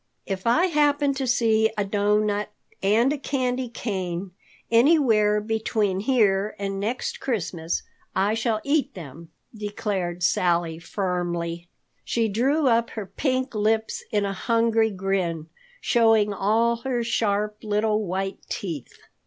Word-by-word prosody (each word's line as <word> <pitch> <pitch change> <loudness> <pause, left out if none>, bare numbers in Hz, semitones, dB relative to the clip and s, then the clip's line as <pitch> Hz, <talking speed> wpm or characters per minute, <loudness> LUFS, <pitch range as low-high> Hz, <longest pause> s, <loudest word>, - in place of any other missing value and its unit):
"If 195 +1 -4
I 310 +10 +4
happen 290 -4 +2
to 270 -1 -3
see 225 -2 +3
a 205 - +1
doughnut 210 +1 +1 0.3
and 225 +8 +3
a 295 - -4
candy 255 -2 -1
cane 190 -5 -4 0.4
anywhere 230 -5 +4
between 215 -2 -1
here 210 -3 +2
and 195 -1 -3
next 225 +5 -3
Christmas, 175 -8 -2 0.3
I 195 +3 +2
shall 225 -1 0
eat 285 +1 0
them," 165 -1 -10 0.3
declared 200 -4 -3
Sally 170 -2 +1
firmly. 175 -2 -3 0.4
She 230 -1 0
drew 270 +8 +2
up 235 -1 +3
her 215 - -3
pink 255 +6 -1
lips 220 +1 0
in 205 -1 +1
a 195 - -2
hungry 230 +1 +2
grin, 185 -5 -2 0.3
showing 225 -3 +3
all 225 +4 +2
her 245 0 -2
sharp 210 -2 0
little 215 0 0
white 195 +1 -3
teeth. 165 -10 -5
210 Hz, 130 wpm, -24 LUFS, 195-235 Hz, 0.4 s, I